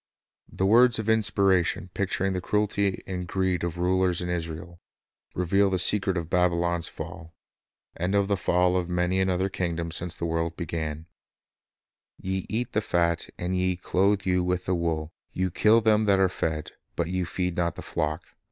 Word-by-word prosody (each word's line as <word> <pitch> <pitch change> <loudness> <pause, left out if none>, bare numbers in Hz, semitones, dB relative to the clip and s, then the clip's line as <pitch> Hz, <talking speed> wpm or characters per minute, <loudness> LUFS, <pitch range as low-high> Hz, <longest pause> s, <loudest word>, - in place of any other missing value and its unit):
The 95 - -2
words 120 +4 +5
of 110 - -2
Oppressive..... - - -10
Power 110 0 +4 0.4
Inspiration 90 0 0
picturing 95 0 -1
the 90 - -2
cruelty 100 -1 0
and 90 -2 -5
greed 95 0 0
of 85 0 -3
rulers 90 0 +1
in 90 - -3
Israel, 85 0 -5 0.5
reveal 95 +3 +2
the 95 - 0
secret 95 0 +2
of 85 -2 -3
Babylon's 85 -1 +1
fall, 80 +1 -9 0.6
and 90 +4 -1
of 100 -1 +2
the 100 - +1
fall 90 -1 +2
of 90 -1 -1
many 90 +1 0
another 95 0 +1
kingdom 85 -3 -3
since 85 0 -1
the 85 - -4
world 85 0 -2
began: 80 -2 -4 1.1
"Ye 95 0 -3
eat 115 +2 -2
the 110 - +1
fat, 85 -4 0
and 90 +1 -2
ye 90 0 +1
clothe 95 +2 +1
you 90 -1 +2
with 90 0 -1
the 90 - 0
wool, 80 -2 -2 0.2
ye 95 -1 -1
kill 110 +5 +4
them 110 -1 +3
that 100 -2 +3
are 95 -1 +4
fed; 80 -4 -3 0.2
but - - -1
ye 90 0 -1
feed 90 0 -2
not 85 -1 0
the - - -8
flock. 75 +3 -2
90 Hz, 180 wpm, -26 LUFS, 85-95 Hz, 1.1 s, words